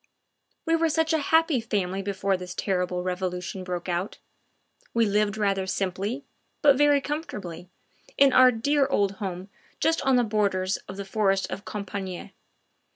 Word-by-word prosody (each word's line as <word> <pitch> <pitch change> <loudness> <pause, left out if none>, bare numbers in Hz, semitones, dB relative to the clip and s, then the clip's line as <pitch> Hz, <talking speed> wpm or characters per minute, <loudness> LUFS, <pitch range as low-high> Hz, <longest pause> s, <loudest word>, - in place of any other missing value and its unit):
We 330 -1 +3
were 330 0 +2
such 320 +1 +1
a 320 - +3
happy 320 -2 +3
family 195 -4 -2
before 195 0 -1
this 180 0 -7
terrible 180 -2 -1
Revolution 180 0 -3
broke 180 -1 -4
out; 180 +2 -2 0.8
we 230 -1 +4
lived 210 0 +1
rather 195 -2 0
simply, 195 +8 -2 0.4
but 285 -2 +7
very 290 +1 +4
comfortably, 205 - -6 0.5
in 275 -1 +6
our 255 0 +8
dear 275 +4 +1
old 200 -7 0
home 190 0 -5 0.3
just 325 0 +2
on 270 -1 +3
the 245 - +4
borders 200 -3 0
of 190 - -8
the 200 - -5
forest 195 -1 0
of 200 - -6
Compiegne. 195 -3 -5
200 Hz, 155 wpm, -26 LUFS, 185-265 Hz, 0.8 s, our